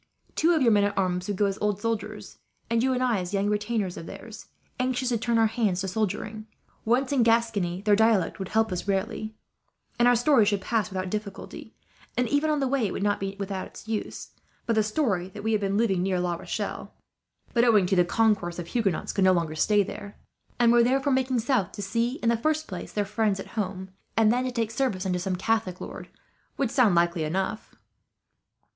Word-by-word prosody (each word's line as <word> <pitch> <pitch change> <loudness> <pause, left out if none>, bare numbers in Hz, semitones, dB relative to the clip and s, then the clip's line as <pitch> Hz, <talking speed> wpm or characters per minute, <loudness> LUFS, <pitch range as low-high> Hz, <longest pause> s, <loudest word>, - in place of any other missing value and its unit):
Two 335 +2 +3
of 305 - +2
your 235 - +5
men 205 -1 +4
at 205 0 -2
arms 180 -1 0
would 205 -2 -2
go 205 - +3
as 195 0 -2
old 210 -1 0
soldiers, 215 -2 -4 0.3
and 230 0 +3
you 260 +2 +2
and 255 0 0
I 240 -5 +2
as 180 +2 -4
young 195 0 +1
relations 210 -2 -1
of 165 - -8
theirs, 210 +3 -10 0.3
anxious 255 0 0
to 240 - +1
turn 235 +1 +1
our 225 - +5
hands 215 -5 0
to 190 - -3
soldiering. 215 +2 -3 0.4
Once 255 +4 +2
in 275 -3 +3
Gascony, 225 -6 +1
their 210 -1 +4
dialect 220 -3 +2
would 190 - -4
help 220 0 +1
us 180 +2 -4
rarely, 200 +2 -2 0.6
and 240 - +5
our 245 - +6
story 245 0 +4
should 205 -1 +1
pass 215 +2 -1
without 185 -1 -4
difficulty; 210 -2 -6 0.4
and 250 0 +2
even 290 +4 +2
on 300 -1 +1
the 270 - +1
way 260 -4 +1
it - - -5
would - - -3
not 205 0 +1
be 195 0 -4
without 195 -1 -4
its - - -13
use, 220 -1 -4 0.3
for 230 - +1
the 220 - +3
story 215 - 0
that 205 +1 -9
they 220 - 0
have 215 -1 +1
been 195 0 0
living 200 -5 +2
near 185 -1 0
La 175 -1 0
Rochelle 170 - -5 0.6
but, 235 - +3
owing 215 -6 +5
to 190 - +1
the 180 - +5
concourse 195 -3 +1
of 175 - -4
Huguenots, 205 -8 -1
could 195 - +1
no 185 0 +6
longer 165 -3 -1
stay 205 +6 +3
there; 200 +1 -8 0.4
and 235 -1 +4
were 240 0 +6
therefore 270 +3 +2
making 260 -1 +1
south 230 -5 0
to 205 - -6
see, 230 +5 0
in 230 - +3
the 235 - +3
first 310 +5 0
place, - - -7
their 205 -1 -1
friends 210 -1 0
at - - -7
home; 190 -3 -4 0.3
and 220 0 +5
then 250 +1 0
to 255 - -2
take 230 -3 -2
service, 225 -6 -1
under 180 -1 0
some 185 0 -2
Catholic 190 -1 -1
lord, - - -8 0.5
would 265 -5 0
sound 235 -9 +4
likely 170 -1 +2
enough." 190 +7 -3
210 Hz, 220 wpm, -26 LUFS, 190-235 Hz, 0.6 s, our